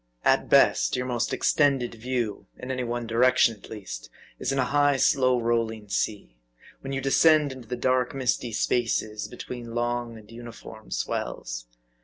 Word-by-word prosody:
At - - +3
best, - - +4
your 125 0 -2
most 120 -2 -1
extended 135 -5 +2
view 120 -2 -3
in 125 - -6
any 130 -1 -2
one 120 0 -3
direction, 115 0 +4
at 105 - -15
least, 95 - -8 0.3
is - - -1
in 135 - -1
a 130 - +2
high, 145 0 +3
slow 130 -2 +3
rolling 115 -2 -1
sea; 100 - -2 0.4
when 135 - -7
you 135 - -1
descend 150 +2 +4
into 130 -3 -10
the 125 - -3
dark, 130 +1 +1
misty 125 -2 -1
spaces, 110 -1 0
between 120 -1 -8
long 120 -1 -2
and 105 0 -15
uniform 115 -2 -11
swells. - - -4
120 Hz, 160 wpm, -26 LUFS, 115-130 Hz, 0.4 s, best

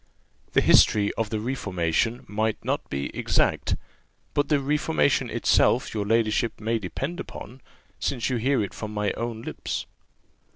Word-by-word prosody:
"The - - +5
history 105 -1 +5
of 115 -2 -2
the 110 - -2
reformation 105 -2 -1
might 110 +1 -1
not - - -1
be 70 0 -4
exact, - - +1 0.6
but 145 -1 +1
the 150 -2 +4
reformation 135 - +1
itself - - +2
your 105 -2 -2
ladyship 115 +1 +1
may 115 +1 0
depend 135 - -4
upon, 125 +5 -8 0.4
since 125 -4 -1
you 130 - 0
hear 130 0 +2
it 100 - -5
from 105 -1 -6
my 105 -1 0
own 115 -1 -4
lips." - - -4
110 Hz, 150 wpm, -25 LUFS, 105-125 Hz, 0.6 s, The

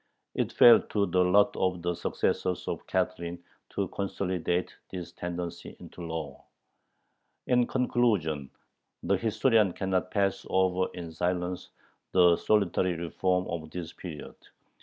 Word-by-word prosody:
It - - -1
fell 120 - +8
to 100 -2 0
the 90 -2 +2
lot 100 +3 +4
of 90 -2 -1
the 90 0 0
successors 90 +1 -1
of - - -4
Catherine 85 0 -2 0.3
to - - -2
consolidate 90 -2 -2 0.2
this 90 -2 -6
tendency 85 -1 -6
into - - -11
law. 80 -4 -5 1.0
In 125 -1 +3
conclusion, 105 - +1 0.5
the - - +2
historian 110 -3 +2
cannot 95 -1 -1
pass 100 -1 0
over 95 0 +2
in 85 -2 -6
silence 90 +2 -2 0.4
the 90 -2 +6
solitary 95 -2 +1
"reform" 90 +2 0
of 80 -2 -5
this 85 0 -6
period. 80 -6 -8
90 Hz, 125 wpm, -28 LUFS, 85-95 Hz, 1.0 s, fell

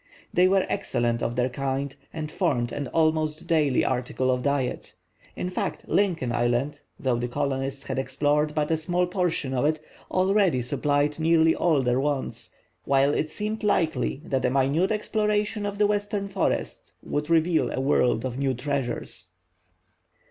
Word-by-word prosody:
They 180 +1 +5
were 190 0 +3
excellent 120 0 -1
of 120 - -1
their 125 +1 +1
kind, 135 +2 -3 0.2
and 155 -1 -5
formed 120 -4 0
an 145 -2 -3
almost 155 0 +1
daily 150 -5 +2
article 130 0 0
of 125 0 0
diet. 140 -2 -2 0.4
In 180 - -3
fact, - - -3
Lincoln 170 -11 +1
Island, 120 +4 0 0.2
though 125 -3 0
the 120 - -1
colonists 135 +2 -2
had - - -2
explored 145 +3 0
but 150 0 0
a 160 - +3
small 175 +3 0
portion 175 -7 -1
of 125 - 0
it, 155 +1 +1 0.3
already 185 - +2
supplied 145 +4 0
nearly 160 0 +4
all 155 -6 +2
their 125 +1 +2
wants, 140 -1 -2 0.3
while 140 +1 +3
it 155 - 0
seemed 215 +6 -4
likely 160 - 0
that 135 -1 -1
a - - +3
minute 140 - +2
exploration 210 -1 0
of 200 0 -4
the 210 - +4
western 205 -1 -1
forests 195 -1 -2
would 150 +2 -3
reveal 165 0 +3
a - - -2
world 130 -3 +2
of 130 0 -4
new 135 -2 +1
treasures. 125 -8 -3
145 Hz, 160 wpm, -26 LUFS, 130-175 Hz, 0.4 s, They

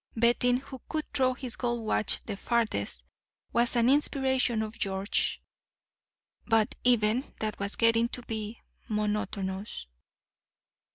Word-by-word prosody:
Betting 240 +2 +4
who 265 0 -9
could 310 -1 -2
throw 255 -2 +2
his 255 -3 -5
gold 240 -2 -1
watch 215 - 0
the 210 - -4
farthest 195 - -1 0.5
was 235 +1 +3
an 235 0 +4
inspiration 265 -4 +2
of 220 +1 -7
George's; 195 0 +1 1.1
but 225 -2 +3
even 240 0 +3 0.2
that 215 -1 -3
was 200 +1 -1
getting 230 0 +3
to 245 - -5
be 220 -1 -5 0.3
monotonous. 210 - -2
230 Hz, 120 wpm, -29 LUFS, 210-245 Hz, 1.1 s, Betting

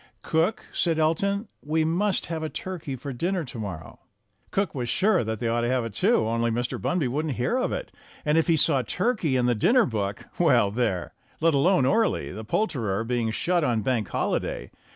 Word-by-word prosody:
"Cook," 170 +9 0
said 165 -3 +1
Elton, 200 +7 +1
"we 155 +2 0
must 185 +4 +1
have 165 -1 -4
a 155 - -2
turkey 170 -8 -5
for 135 +2 -6
dinner 175 +7 -1
to 120 -2 -8
morrow." 90 -7 -7 0.5
Cook 200 0 -1
was 125 -4 -3
sure 190 - +3
that 110 0 -3
they 115 - -2
ought 115 +1 +1
to 120 - 0
have 125 -1 +1
it, 115 - -6
too, 200 - +2
only 115 +1 +1
Mr. 120 +2 -2
Bunby 175 -7 0
wouldn't 145 +2 -2
hear 125 - 0
of 255 - 0
it, - - -4 0.3
and 150 0 +2
if 165 - +3
he 165 -2 +4
saw 140 -3 +3
turkey 180 - 0
in 125 - +2
the 125 - +3
dinner 230 - +4
book 100 -4 -3
well, 100 - +4
there! 105 -6 -1 0.3
Let 165 0 +3
alone 145 +1 +3
Orley, 195 - +1
the 110 +6 -7
poulterer, 115 - -1
being 115 -1 -1
shut 175 +9 +1
on 115 -6 +1
Bank 115 -3 0
Holiday. - - -2
140 Hz, 200 wpm, -26 LUFS, 115-180 Hz, 0.5 s, he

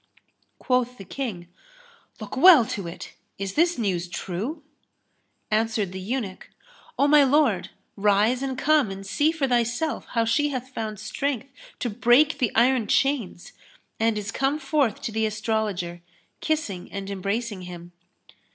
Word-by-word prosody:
Quoth 250 -1 0
the 195 - -10
King, 195 -6 -5 0.7
"Look - - -7
well 300 -3 +8
to 200 -4 -4
it, 170 - -9 0.2
is 195 0 -4
this 340 +2 +2
news 185 -6 -1
true?" 210 - -5 0.9
Answered 220 -3 0
the 190 - -6
eunuch, 200 -1 -4 0.5
"O 280 - +4
my 295 0 +7
lord, 260 - +2 0.3
rise 210 +5 +2
and 265 -1 -3
come 300 -5 +3
and 195 0 -7
see 295 +10 +2
for 310 -5 -1
thyself 245 +5 0
how 230 -1 +3
she 295 +6 +2
hath 260 -2 -4
found 220 -5 -5
strength 265 +4 -3 0.3
to 245 - -2
break 255 +7 +4
the 245 -6 +1
iron 240 -1 +3
chains 255 -11 0 0.5
and 225 -1 +2
is 210 +1 -4
come 270 +5 0
forth 275 -6 0
to - - -3
the 220 0 0
Astrologer, 210 -5 -2 0.4
kissing 260 - -2
and 195 -1 -5
embracing 200 +2 -3
him." 175 0 -10
230 Hz, 145 wpm, -25 LUFS, 200-270 Hz, 0.9 s, well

